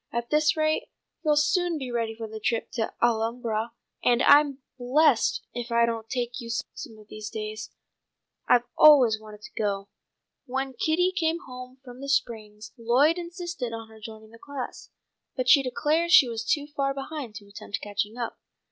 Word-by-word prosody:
"At 235 0 -3
this 300 0 +3
rate 310 0 0 0.3
you'll 305 -2 +3
soon 335 +3 +2
be 260 -4 -5
ready 230 -2 -2
for 225 0 -6
a 220 0 -8
trip 225 +2 -1
to 225 -2 -2
the - - +3
Alhambra, 230 0 -1 0.3
and 245 0 +3
I'm 285 -2 +5 0.2
blessed 260 +1 +3
if 240 0 -5
I 235 0 +4
don't 225 -1 -4
take 245 0 -3
you 230 - -8
some 230 -1 -6
of 215 -1 -16
these 215 0 -7
days. 215 0 -6 0.8
I've 245 -1 +5
always 260 -8 +7
wanted 210 -1 -12
to - - -10
go." 200 -2 -2 0.6
When 265 +1 -3
Kitty 325 +8 +1
came 335 -1 0
home 255 -3 -10
from 250 +1 -11
the 275 - -6
springs 215 -6 -2
Lloyd 270 +9 +3
insisted 345 -8 -5
on 225 -1 -7
her 220 0 -15
joining 220 0 -11
the 230 - -15
class, 280 -2 -7 0.5
but 255 -2 -2
she 280 +1 +7
declared 305 +6 0
she 285 -7 +8
was 230 -1 -4
too 290 +5 0
far 275 -2 -2
behind 275 -4 -6
to 205 - -9
attempt 200 0 -6
catching 210 +2 -3
up. 235 -2 -4
245 Hz, 180 wpm, -26 LUFS, 220-290 Hz, 0.8 s, she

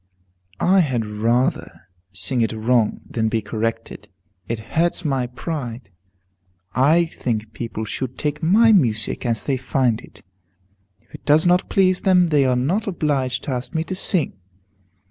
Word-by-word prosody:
I 190 +2 +4
had 130 -9 +1
rather 115 +4 -1 0.3
sing 110 +6 -2
it 115 - 0
wrong, 110 0 +1
than 110 -1 -1
be 110 - 0
corrected. 115 +2 -4 0.4
It 115 - -2 0.2
hurts 170 +1 +1
my 135 -4 0
pride. 125 - -6 0.8
I 155 +7 +4
think 110 -8 -4
people 115 -2 -5
should 130 +3 -5
take 150 0 -2
my 215 +8 +5
music 120 - +1
as 115 -3 0
they 135 -2 0
find 130 -3 0
it. - - -17 0.8
If - - -32
it - - -11
does 150 +3 +4
not 180 +1 +3
please 185 -1 +2
them, 180 -2 +4
they 145 -3 +3
are 130 -1 +2
not 170 - 0
obliged 140 -8 -1
to - - -4
ask 125 +5 -4
me 160 - +1
to 185 - -5
sing. 185 -3 +1
130 Hz, 155 wpm, -21 LUFS, 115-165 Hz, 0.8 s, my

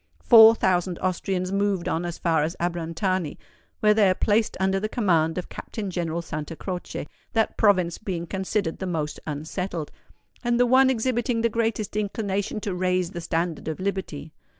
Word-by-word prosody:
Four 225 -1 +9
thousand 180 -3 +1
Austrians 185 0 -2
moved 200 -2 0
on 165 +2 -1
as 170 -1 -4
far 165 -3 +1
as 160 +4 -1
Abrantani, 170 0 -2 0.4
where 210 0 +5
they 210 -3 +4
are 185 - +2
placed 215 +3 +1
under 190 0 +1
the 215 +2 -2
command 170 -8 +1
of 180 - -3
Captain 205 -4 -6
General 170 -1 -2
Santa 155 0 -5
Croce, 180 -3 -5 0.3
that 225 -1 +1
province 185 -6 +2
being 180 -5 -4
considered 190 0 -2
the 190 - -3
most 155 -4 -3
unsettled, 160 +2 -4 0.5
and 240 0 +1
the 245 - +5
one 260 +2 +5
exhibiting 240 -1 0
the 230 - +2
greatest 225 -2 -1
inclination 205 -1 -2
to 205 -3 -3
raise 180 0 0
the 175 - -6
standard 165 -1 -2
of 160 +1 -3
liberty. 185 -6 -4
185 Hz, 170 wpm, -25 LUFS, 170-210 Hz, 0.5 s, Four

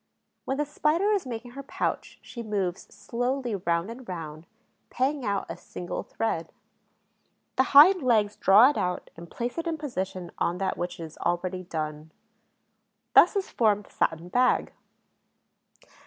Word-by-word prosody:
When 265 - -2
the 295 - 0
Spider 305 +7 +1
is 395 -9 0
making 240 0 -6
her 275 +3 -7
pouch 275 - -3
she 235 - -8
moves 200 -5 -3
slowly 245 0 -2
round 175 +1 -1
and 240 -2 -10
round, 160 -2 -7 0.4
paying 270 +2 -1
out 200 -3 -1
a - - -6
single 175 - -6
thread. 165 -7 -3 1.0
The 260 - +3
hind 360 +5 +9
legs 215 -5 +2
draw 215 +8 +6
it - - -6
out 180 0 -3
and 170 +1 -11
place 245 +6 -4
it 330 - -3
in 325 -1 -1
position 190 - -4
on 175 - 0
that 190 0 -1
which 175 0 -5
is 160 -1 -9
already 180 +1 -1
done. 155 -2 -5 1.0
Thus - - +7
is 395 -1 -2
formed 210 -3 +2
the - - -21
satin 165 +2 -1
bag. 250 +6 +2
215 Hz, 155 wpm, -27 LUFS, 175-260 Hz, 1.0 s, hind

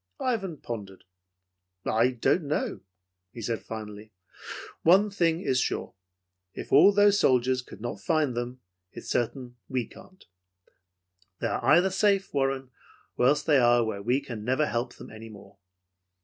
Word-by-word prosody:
Ivan 195 -10 -2
pondered. 100 -7 -8 0.8
"I 115 +3 +3
don't 135 +6 0
know," 150 - -2 0.5
he - - -10
said 115 +1 -2
finally. 110 -1 -8 0.7
"One 195 +5 +4
thing 170 -3 +1
is 130 -9 +1
sure, - - -2 0.6
if - - -8
all 165 +9 +8
those 205 0 +4
soldiers 130 0 +2
could 120 - -13
not 115 -4 -5
find 150 0 0
them, 120 +1 -5 0.3
it - - -9
is - - -6
certain 125 +1 -2
we 130 -3 -1
can't. 185 - -17 1.1
They - - -3
are - - -2
either 185 +2 +4
safe, 195 0 +1
Warren, 135 -2 -1 0.4
or 125 - +3
else 145 +2 +2
they 145 -3 +4
are 120 -1 +4
where 105 -3 -4
we 125 +6 +1
can 115 -6 -7
never 130 +6 +1
help 120 -2 -3
them - - -12
any 110 +1 -10
more. 100 -2 -15
130 Hz, 155 wpm, -27 LUFS, 115-160 Hz, 1.1 s, all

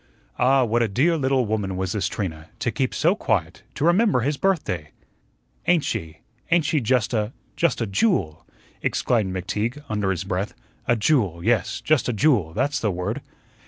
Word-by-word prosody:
Ah, 130 +1 +4
what 120 0 +1
a 115 - +3
dear 140 - +2
little 135 -4 +1
woman 105 -3 -2
was 95 -1 -2
this 105 - 0
Trina, 80 -6 -5
to 120 - -1
keep 130 -1 -1
so 170 +4 +2
quiet, 95 - -1
to 145 - 0
remember 180 - +4
his 145 +5 0
birthday! 135 - -1 0.8
"Ain't 175 -4 +4
she 80 0 -4 0.3
ain't 170 -2 +3
she 150 0 +1
just 125 0 +1
a 110 +1 0 0.2
just 170 -7 +1
a - - +1
JEWEL," 95 - 0 0.4
exclaimed 110 -6 +1
McTeague 105 +9 -3
under 105 -2 0
his 95 -1 -1
breath, 95 +2 -3 0.3
"a 120 - +4
JEWEL 105 - +1
yes, 115 -4 +1
just 155 -5 +2
a - - 0
JEWEL; 110 - +2
that's 135 +6 0
the 110 - 0
word." 100 +8 -3
115 Hz, 175 wpm, -23 LUFS, 95-140 Hz, 0.8 s, Ah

